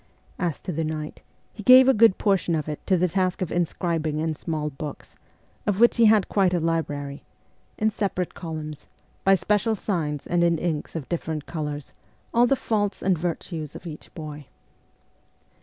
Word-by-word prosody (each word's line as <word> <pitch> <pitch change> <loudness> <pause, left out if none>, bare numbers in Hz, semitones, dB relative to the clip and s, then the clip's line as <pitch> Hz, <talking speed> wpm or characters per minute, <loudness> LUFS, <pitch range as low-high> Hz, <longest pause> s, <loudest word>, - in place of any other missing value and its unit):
As 175 -6 -1
to - - -4
the 165 0 -1
night, 155 -1 -5 0.3
he 215 - -9
gave 255 +4 +8
a 265 - +6
good 225 -3 +5
portion 195 -5 +1
of 155 -2 -2
it 150 -1 -5
to 190 - +4
the 180 +1 +2
task 185 +1 0
of 170 - -5
inscribing 165 -3 -1
in 160 +1 0
small 155 -1 -3
books 145 +1 -8 0.5
of 205 -1 +1
which 235 +1 +5
he 230 - +6
had 215 -2 +5
quite 190 -3 +2
a - - +2
library 145 -4 -2 0.5
in 220 0 +2
separate 190 -4 -2
columns, 155 -3 -7 0.4
by 195 0 +6
special 210 +3 +1
signs 160 -8 -2
and 175 -1 +1
in 170 -1 +3
inks 160 -2 -3
of 155 -5 -4
differ 165 -2 -3
ent 150 -1 -5
colours, 150 -3 -5 0.4
all 240 +1 +5
the 275 - +3
faults 210 -5 -1
and 190 -1 +3
virtues 165 -2 -4
of - - -10
each 155 -3 -9
boy. 150 -3 -8
170 Hz, 180 wpm, -25 LUFS, 155-195 Hz, 0.5 s, gave